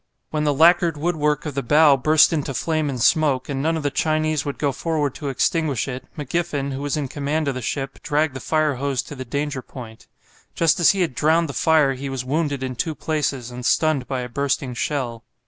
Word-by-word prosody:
When 150 Hz, -1 st, -1 dB
the 145 Hz, -, +2 dB
lacquered 170 Hz, +1 st, +4 dB
woodwork 150 Hz, -2 st, 0 dB
of 150 Hz, -, -4 dB
the 140 Hz, -, -1 dB
bow 145 Hz, +3 st, +5 dB
burst 155 Hz, +5 st, +4 dB
into 140 Hz, -4 st, -2 dB
flame 155 Hz, 0 st, -1 dB
and 130 Hz, -3 st, -4 dB
smoke, 135 Hz, 0 st, +2 dB
and 135 Hz, -1 st, -2 dB
none 160 Hz, +2 st, +1 dB
of 155 Hz, -, -4 dB
the 145 Hz, -, 0 dB
Chinese 155 Hz, +1 st, 0 dB
would 145 Hz, -, -4 dB
go 145 Hz, -2 st, 0 dB
forward 150 Hz, -1 st, -1 dB
to 145 Hz, -, -5 dB
extinguish 145 Hz, 0 st, 0 dB
it, 130 Hz, -1 st, -6 dB
McGiffen, 145 Hz, -2 st, -2 dB
who 135 Hz, -, -5 dB
was 145 Hz, +1 st, -2 dB
in 145 Hz, -2 st, -2 dB
command 145 Hz, +3 st, -2 dB
of 140 Hz, -, 0 dB
the 130 Hz, -, -5 dB
ship, 135 Hz, +4 st, -4 dB
dragged 150 Hz, 0 st, 0 dB
the 130 Hz, -, -6 dB
fire 155 Hz, -3 st, 0 dB
hose 135 Hz, -1 st, -1 dB
to 145 Hz, -, -9 dB
the 130 Hz, -1 st, -7 dB
danger 140 Hz, +2 st, -3 dB
point. 115 Hz, -4 st, -11 dB, 0.5 s
Just 165 Hz, 0 st, +2 dB
as 170 Hz, -, +6 dB
he 195 Hz, -, +2 dB
had 170 Hz, -7 st, 0 dB
drowned 160 Hz, +5 st, +2 dB
the -, -, -5 dB
fire 155 Hz, -3 st, +3 dB
he 135 Hz, +1 st, -6 dB
was 130 Hz, -2 st, -4 dB
wounded 145 Hz, -1 st, -1 dB
in 130 Hz, -1 st, -4 dB
two 155 Hz, +6 st, -2 dB
places 140 Hz, -7 st, -2 dB
and 125 Hz, 0 st, -7 dB
stunned 155 Hz, -1 st, +1 dB
by 130 Hz, -2 st, -2 dB
a 125 Hz, -, -5 dB
bursting 135 Hz, 0 st, -1 dB
shell. 120 Hz, -3 st, -3 dB
145 Hz, 225 wpm, -22 LUFS, 135-155 Hz, 0.5 s, as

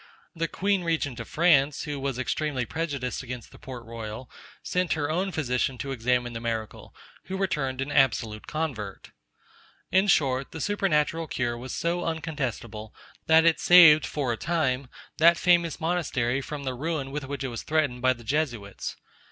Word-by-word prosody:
The 165 Hz, 0 st, -1 dB
queen 195 Hz, +2 st, 0 dB
regent 155 Hz, -7 st, -1 dB
of 115 Hz, -, -6 dB
France, 150 Hz, -4 st, +3 dB
who 145 Hz, -1 st, -4 dB
was 135 Hz, -2 st, -2 dB
extremely 130 Hz, 0 st, -1 dB
prejudiced 140 Hz, -4 st, -3 dB
against 125 Hz, -2 st, -8 dB
the -, -, -15 dB
Port 125 Hz, -3 st, -9 dB
Royal, 115 Hz, +1 st, -7 dB, 0.3 s
sent 180 Hz, -1 st, 0 dB
her 150 Hz, -1 st, -1 dB
own 185 Hz, +4 st, 0 dB
physician 125 Hz, -4 st, -1 dB
to 135 Hz, +4 st, -4 dB
examine 125 Hz, -1 st, 0 dB
the 115 Hz, -, -5 dB
miracle, 115 Hz, -2 st, -5 dB, 0.3 s
who 190 Hz, -, -4 dB
returned 145 Hz, -9 st, -1 dB
an 140 Hz, +2 st, -3 dB
absolute 115 Hz, -6 st, +1 dB
convert. 130 Hz, -11 st, -4 dB, 0.8 s
In 190 Hz, +2 st, +4 dB
short, 135 Hz, -7 st, +2 dB
the 160 Hz, -, -6 dB
supernatural 165 Hz, -4 st, 0 dB
cure 120 Hz, -4 st, -1 dB
was 125 Hz, +2 st, -7 dB
so 175 Hz, +1 st, -1 dB
uncontestable, 130 Hz, -9 st, -4 dB, 0.3 s
that 160 Hz, 0 st, +6 dB
it 165 Hz, -1 st, +4 dB
saved, 170 Hz, -4 st, +8 dB
for 135 Hz, -5 st, -1 dB
a -, -, -5 dB
time, 140 Hz, -5 st, 0 dB, 0.3 s
that 170 Hz, +2 st, +6 dB
famous 170 Hz, -2 st, +3 dB
monastery 150 Hz, -7 st, 0 dB
from 145 Hz, +1 st, -6 dB
the 130 Hz, -1 st, -2 dB
ruin 140 Hz, 0 st, -3 dB
with 145 Hz, -1 st, -4 dB
which 140 Hz, +1 st, -5 dB
it 135 Hz, -, -2 dB
was 115 Hz, -2 st, -5 dB
threatened 145 Hz, -6 st, 0 dB
by 130 Hz, 0 st, +4 dB
the 120 Hz, -1 st, -14 dB
Jesuits. 120 Hz, -6 st, -2 dB
140 Hz, 170 wpm, -27 LUFS, 125-160 Hz, 0.8 s, saved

